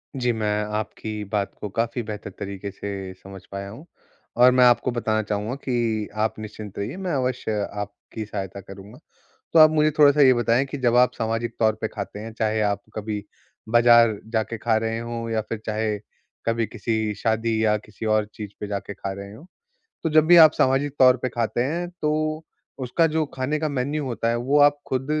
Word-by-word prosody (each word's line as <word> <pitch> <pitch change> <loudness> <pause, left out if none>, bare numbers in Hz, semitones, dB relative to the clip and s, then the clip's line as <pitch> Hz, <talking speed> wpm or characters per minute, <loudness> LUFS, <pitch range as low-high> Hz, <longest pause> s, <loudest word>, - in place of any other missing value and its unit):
जी। 125 -2 +1
मैं 105 -2 -1
आपकी 110 0 -4
बात 100 -1 -1
को 105 - -4
काफ़ी 115 +4 -1
बेहतर 105 -1 -6
तरीके 100 0 -5
से 95 -1 -6
समझ 95 +1 -12
पाया 100 0 -5
हूँ। 115 +10 -11 0.5
और 125 +1 +7
मैं 125 0 +5
आपको 120 +1 +4
बताना 110 -2 0
चाहूँगा 105 +4 -3
कि 120 -5 -1 0.2
आप 110 - 0
निश्चिंत 105 -1 -8
रहिए, 100 - -4
मैं 185 -2 -3
अवश्य 125 -5 -1 0.2
आपकी 105 +2 -7
सहायता 100 -2 -5
करूँगा। 100 +6 -12 0.5
तो 165 - +6
आप 155 - +9
मुझे 155 0 +3
थोड़ा-सा 145 0 +6
ये 130 -2 +7
बताएँ 120 +2 +2
कि 140 +1 -6
जब 120 -2 +2
आप 125 0 +5
सामाजिक 115 +1 -2
तौर 110 -1 +3
पे 110 - 0
खाते 105 -1 -7
हैं, 110 +1 -7
चाहे 110 -1 0
आप 100 -1 0
कभी 105 -1 -4 0.5
बाज़ार 120 -2 +5
जाके 110 +1 -1
खा 115 +1 +1
रहे 115 0 -2
हो 115 0 -5
या 110 -1 0
फिर 115 - -3
चाहे 110 -1 -1 0.5
कभी 115 0 +1
किसी 110 -1 -2
शादी 110 +1 0
या 105 - +3
किसी 105 +1 -10
और 110 0 +2
चीज़ 105 -2 -6
पे 105 - -5
जाके 100 0 -4
खा 100 - -5
रहे 100 +1 -9
हो। 145 +10 -13 0.6
तो 160 - 0
जब 155 0 +5
भी 175 +1 +7
आप 155 -2 +9
सामाजिक 135 +2 +1
तौर 130 -1 +7
पे 130 - 0
खाते 120 0 -1
हैं 170 +5 -2
तो 155 +1 0 0.3
उसका 135 +6 +1
जो 160 -1 +2
खाने 135 +4 -1
का 155 0 -1
मेन्यू 140 +2 -2
होता 115 -3 -2
है, 115 - +1
वो 135 +5 +1
आप 145 0 +5
खुद 130 0 -1
115 Hz, 200 wpm, -24 LUFS, 105-130 Hz, 0.6 s, आप